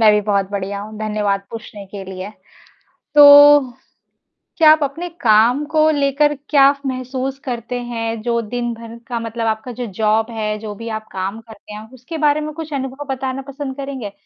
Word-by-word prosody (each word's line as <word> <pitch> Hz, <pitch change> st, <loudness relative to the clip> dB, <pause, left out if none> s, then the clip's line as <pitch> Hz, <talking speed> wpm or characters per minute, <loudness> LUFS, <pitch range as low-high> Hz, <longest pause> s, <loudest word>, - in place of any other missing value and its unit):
मैं 220 Hz, -1 st, +7 dB
भी 210 Hz, -, +3 dB
बहुत 200 Hz, -2 st, -1 dB
बढ़िया 200 Hz, 0 st, -4 dB
हूँ, 215 Hz, +1 st, -9 dB
धन्यवाद 210 Hz, -2 st, -1 dB
पूछने 215 Hz, -3 st, -9 dB
के 195 Hz, 0 st, -8 dB
लिए। 190 Hz, +1 st, -7 dB, 0.8 s
तो 290 Hz, 0 st, +9 dB, 1.0 s
क्या 315 Hz, -2 st, +7 dB
आप 310 Hz, -1 st, +2 dB
अपने 325 Hz, +6 st, -4 dB
काम 235 Hz, +5 st, +4 dB
को 310 Hz, 0 st, +4 dB
लेकर 290 Hz, 0 st, +2 dB, 0.2 s
क्या 280 Hz, -2 st, +6 dB, 0.2 s
महसूस 260 Hz, +1 st, -4 dB
करते 245 Hz, -1 st, -4 dB
हैं? 230 Hz, -2 st, -4 dB
जो 235 Hz, 0 st, 0 dB
दिन 240 Hz, +2 st, -3 dB
भर 230 Hz, 0 st, -11 dB
का 240 Hz, -2 st, -2 dB
मतलब 230 Hz, 0 st, -4 dB
आपका 220 Hz, +3 st, -3 dB
जो 240 Hz, 0 st, -5 dB
जॉब 220 Hz, +1 st, +1 dB
है, 215 Hz, -2 st, -3 dB
जो 210 Hz, -1 st, -7 dB
भी 230 Hz, +3 st, -8 dB
आप 220 Hz, -1 st, -5 dB
काम 195 Hz, +3 st, -4 dB
करते 220 Hz, -2 st, -13 dB
हैं, 215 Hz, +1 st, -9 dB
उसके 260 Hz, +6 st, -8 dB
बारे 300 Hz, -1 st, +2 dB
में 305 Hz, 0 st, -5 dB
कुछ 315 Hz, -1 st, -7 dB
अनुभव 270 Hz, +1 st, -4 dB
बताना 265 Hz, 0 st, -4 dB
पसंद 275 Hz, -1 st, -6 dB
करेंगे? 270 Hz, -7 st, -6 dB
235 Hz, 180 wpm, -19 LUFS, 215-275 Hz, 1.0 s, तो